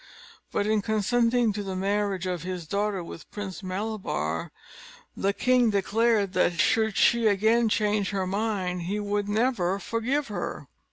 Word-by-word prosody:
But 205 - 0
in 215 0 +2
consenting 230 +2 +2
to 205 - -3
the 190 -2 -4
marriage 195 -1 -1
of 180 -3 -2
his 180 -1 -5
daughter 200 +1 -1
with 165 -2 -10
Prince 200 -3 -6
Malabar, 185 - -3 0.6
the 195 - +1
king 250 +2 +3
declared 205 0 +1
that, 175 -2 +1
should 220 +6 +2
she 235 -1 +4
again 220 +3 +3
change 210 -1 +1
her 195 -2 -1
mind, 190 -2 -1
he 205 +2 -1
would 205 0 -1
never 210 -4 +1
forgive 245 +8 -1
her. 205 - -4
205 Hz, 150 wpm, -26 LUFS, 190-220 Hz, 0.6 s, she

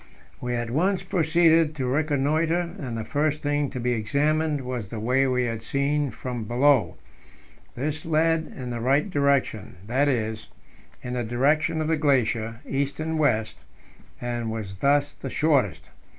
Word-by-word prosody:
We 125 0 -2
at 120 -1 -3
once 185 +8 +1
proceeded 165 -2 +3
to 135 -3 -2
reconnoitre, 155 +5 +1
and 125 -5 -4
the 110 - -4
first 150 +3 -1
thing 145 -1 0
to 130 - -5
be 125 +1 0
examined 145 +7 0
was 125 -5 -4
the 110 - -5
way 125 +5 +2
we 125 -1 +1
had 115 -2 -3
seen 140 +4 0
from 125 -3 -5
below. 130 +2 +3 0.8
This 150 +5 -3
led 160 0 +1
in 125 -2 -5
the 120 - -3
right 135 - +2
direction 140 - 0
that 130 +6 +1
is, 110 -4 -1 0.6
in 125 - -4
the 125 -1 -1
direction 150 +7 +1
of 155 - -1
the 160 0 +1
glacier, 120 -6 +1
east 140 +2 -2
and 160 0 -2
west 110 -7 +1 0.6
and 120 -2 -3
was 105 -4 -5
thus 145 +4 +2
the 135 - -7
shortest. 105 - +1
140 Hz, 160 wpm, -25 LUFS, 120-155 Hz, 0.8 s, proceeded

